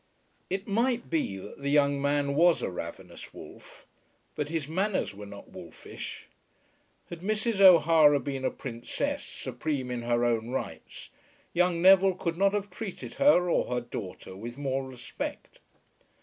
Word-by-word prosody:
It 190 +2 -3
might 235 +2 0
be 150 -12 0
that 100 +8 -10
the 140 - -1
young 140 -1 +3
man 140 0 +1
was 170 +3 +4
a - - -2
ravenous 85 -1 -8
wolf, - - -13 0.5
but 150 -1 -3
his 160 -3 -2
manners 190 - -1
were 100 +1 -9
not 100 0 -11
wolfish. - - -9 0.9
Had 170 - -6
Mrs. 215 +3 -1
O'Hara 165 -5 +7
been 135 -1 -4
a - - +2
princess, 120 -3 -4
supreme 140 -5 -4
in 120 -1 -3
her 120 0 +1
own 115 -1 0
rights, 130 - -6 0.4
young 175 -1 +2
Neville 190 0 +6
could 170 -2 -2
not 195 +3 +3
have 205 -1 -2
treated 210 -5 -7
her 275 -11 +5
or 175 - +2
her 125 0 -1
daughter 95 -5 -8
with 120 +5 -8
more 135 -1 -2
respect. 125 -2 -7
145 Hz, 150 wpm, -28 LUFS, 125-185 Hz, 0.9 s, O'Hara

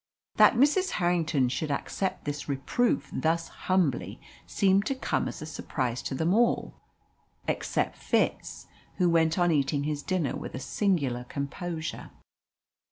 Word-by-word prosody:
That - - +7
Mrs. 295 +10 +3
Harrington 170 -7 +2
should 150 +5 -2
accept 185 +6 -2
this 145 0 -4
reproof 140 - 0
thus 165 +1 0 0.2
humbly 180 -8 +1 0.3
seemed 200 +1 +2
to 275 - 0
come 260 - -1
as - - -6
a - - -5
surprise 130 -5 -3
to 135 - -4
them 160 +6 +1
all, 235 +2 +2 0.7
except - - -1
Fitz, - - -1 0.3
who 180 -2 +2
went 165 0 +3
on 175 -1 +3
eating 140 -1 +1
his 150 -1 -2
dinner 170 -5 -1
with - - -6
a - - -4
singular 135 - 0
composure. 160 +5 -5
160 Hz, 140 wpm, -28 LUFS, 140-185 Hz, 0.7 s, That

